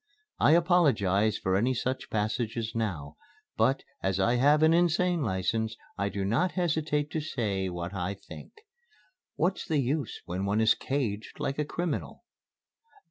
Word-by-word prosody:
I 150 - +5
apologize 135 - +3
for 95 0 0
any 125 +6 +2
such 130 +2 -3
passages 110 +1 -2
now, 80 -11 -3 0.4
but, 135 +1 +2 0.2
as 95 0 0
I 120 +6 +3
have 145 +4 +4
an 160 +1 +6
Insane 175 0 +2
License, 110 +1 -1 0.2
I 100 0 -1
do 100 -1 -3
not 155 - +1
hesitate 155 -4 0
to 160 - -1
say 100 -10 -2
what 90 +1 -5
I 95 +1 -2
think. - - -12 0.8
What's 180 +4 0
the 155 - +1
use 140 +2 -1
when 90 +3 -3
one 100 +2 +1
is 110 0 +5
caged 115 -6 -3
like 140 +2 -2
a 150 - +1
criminal? 170 +1 -4
115 Hz, 150 wpm, -28 LUFS, 100-150 Hz, 0.8 s, an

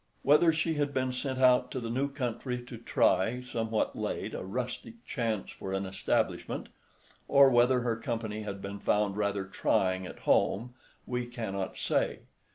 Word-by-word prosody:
Whether 150 +4 +6
she 160 +1 0
had 145 -1 0
been 130 -1 0
sent 130 +1 -3
out 125 -1 +5
to 130 - -3
the 115 -2 -4
new 135 +4 0
country 125 -2 -3
to 120 -2 -9
try, 115 +1 +2
somewhat 115 -3 -1
late, - - -3
a - - -4
rustic 125 - -5
chance 115 -6 -2
for 95 - -6
an 95 0 -1
establishment, 95 +1 -1 0.6
or 140 -1 +7
whether 125 +1 +4
her 115 -2 0
company 115 -3 -3
had 100 -2 -6
been 100 +1 -5
found 105 -1 +1
rather 100 -1 -1
trying 95 -1 0
at - - -11
home, 120 +5 +2 0.3
we 125 -1 -2
cannot 100 -6 -4
say. - - 0
120 Hz, 165 wpm, -30 LUFS, 100-130 Hz, 0.6 s, or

